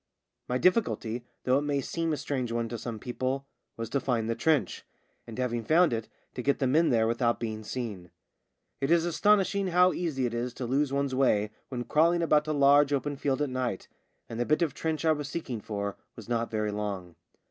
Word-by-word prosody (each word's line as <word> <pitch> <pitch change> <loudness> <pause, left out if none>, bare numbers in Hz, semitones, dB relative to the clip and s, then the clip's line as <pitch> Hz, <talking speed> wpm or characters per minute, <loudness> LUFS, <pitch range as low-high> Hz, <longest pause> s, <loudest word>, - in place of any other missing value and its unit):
My 125 - +1
difficulty 125 - +1
— - - -47
though 130 +2 +3
it - - -3
may 145 -1 0
seem 165 +4 -2
a 150 - 0
strange 130 -5 -2
one 115 0 -1
to 120 - -4
some 115 0 -5
people 130 +4 -3 0.2
— - - -52
was 115 0 -3
to 140 - +1
find 120 -4 -1
the 115 - +1
trench, 155 +4 +1 0.4
and 115 - -8
having 120 -2 -1
found 160 +3 +4
it 115 -1 -3 0.2
to 125 - -4
get 140 +3 +1
the 135 - 0
men 155 +6 +3
there 115 -3 +3
without 115 +1 +1
being 110 -2 -4
seen. 105 -7 -5 0.7
It 135 +1 -1
is 170 0 +4
astonishing 200 +2 +2
how 180 +1 +4
easy 150 -7 -1
it 120 - -2
is 120 +1 -3
to 130 - -4
lose 135 +3 +1
one's 140 -1 0
way 105 -6 +2 0.2
when 125 -2 -3
crawling 170 +5 +3
about 150 -2 +3
a - - 0
large 145 0 +5
open 145 +1 -1
field 140 +1 0
at 140 - -2
night, 125 -6 -2 0.4
and 115 - -6
the 120 - +1
bit 155 +3 +3
of 155 -5 -1
trench 160 0 -2
I 160 - +5
was 150 -2 -2
seeking 130 -9 -4
for 100 -2 -4 0.2
was 115 - -11
not 115 -1 -1
very 105 -1 -1
long. 100 -4 -4
130 Hz, 220 wpm, -28 LUFS, 115-150 Hz, 0.7 s, large